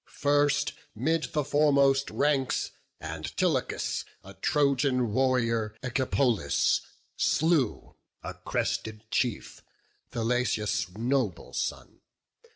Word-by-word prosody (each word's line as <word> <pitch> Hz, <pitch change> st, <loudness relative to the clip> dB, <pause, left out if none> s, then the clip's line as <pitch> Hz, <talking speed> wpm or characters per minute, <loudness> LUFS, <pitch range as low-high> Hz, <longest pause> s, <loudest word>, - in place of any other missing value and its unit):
First 145 Hz, 0 st, +2 dB, 0.2 s
'mid 155 Hz, +8 st, 0 dB
the 150 Hz, -2 st, -1 dB
foremost 140 Hz, -1 st, +3 dB
ranks 140 Hz, -3 st, 0 dB, 0.3 s
Antilochus 80 Hz, -1 st, -1 dB, 0.2 s
A -, -, -11 dB
Trojan 135 Hz, -5 st, +1 dB
warrior, 115 Hz, -4 st, +1 dB
Echepolus, 125 Hz, -, +1 dB, 0.4 s
slew, 155 Hz, -8 st, +1 dB, 0.3 s
A -, -, -5 dB
crested 110 Hz, 0 st, -3 dB
chief, 120 Hz, -3 st, -1 dB, 0.5 s
Thalesius' 115 Hz, -4 st, 0 dB
noble 120 Hz, -5 st, -1 dB
son. -, -, -4 dB
130 Hz, 80 wpm, -28 LUFS, 115-145 Hz, 0.5 s, foremost